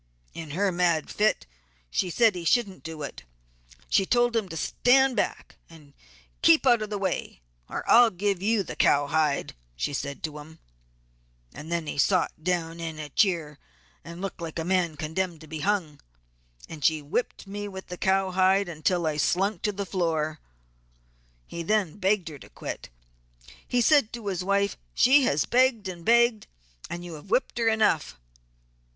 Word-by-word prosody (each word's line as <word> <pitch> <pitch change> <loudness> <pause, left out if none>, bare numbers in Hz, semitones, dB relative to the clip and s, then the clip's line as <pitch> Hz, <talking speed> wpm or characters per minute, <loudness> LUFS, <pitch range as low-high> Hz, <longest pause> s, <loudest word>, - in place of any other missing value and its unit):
In 160 -2 -8
her 200 0 +2
mad 170 -3 +1
fit 215 +1 +1 0.5
she 185 - 0
said 225 +4 +3
he 175 -2 -6
shouldn't 200 +1 +1
do 160 -2 -7
it, 140 - -7 0.7
and 195 - +3
told 240 -1 +2
him 215 -5 0
to 165 - -6
stand 265 - +3
back 205 - -3
and 150 -4 -16 0.5
keep 165 +7 +5
out 240 -3 +5
of 215 - -4
the 210 - -3
way 185 - -3 0.3
or - - -5
I 240 - +8
will 240 - +5
give 195 -1 -2
you 215 0 +1
the - - -7
cowhide 145 0 +2 0.2
she - - -3
said 140 +1 -5
to 150 -1 -4
him. 160 +2 -13 1.0
He - - -7
then 165 +1 -3
'sot' 180 -2 +1
down 170 -2 -1
in 165 -2 -5
a 150 -1 -7
'cheer' 160 -4 0 0.4
and 170 +2 -9
looked 195 -3 -5
like 165 -1 -6
a 165 - -2
man 175 -4 0
condemned 165 +3 -3
to 155 - -12
be 155 0 -6
hung; 175 -5 -1 0.7
then 155 -2 -9
she 155 +1 +2
whipped 160 +12 -3
me 205 +1 -6
with 190 -1 -8
the 180 - -5
cowhide 190 0 +2
until 170 +1 -1
I 155 -1 -1
sunk 195 +7 +1
to 210 - 0
the 200 0 -4
floor. 160 -5 -1 1.1
He 170 - -7
then 205 0 0
begged 190 -1 +1
her 145 -3 -10
to - - -14
quit. - - -7 0.8
He 245 - +1
said 280 -3 +4
to 235 -3 -7
his 185 -3 -2
wife 200 +1 0 0.2
she 265 +2 +5
has 145 -7 +1
begged 245 -4 +2
and 175 -2 -7
begged 235 0 +3 0.4
and 175 0 -6
you 175 - -8
have 155 +5 -11
whipped 240 +2 0
her 230 - +1
enough. 210 - +1
180 Hz, 175 wpm, -26 LUFS, 160-205 Hz, 1.1 s, I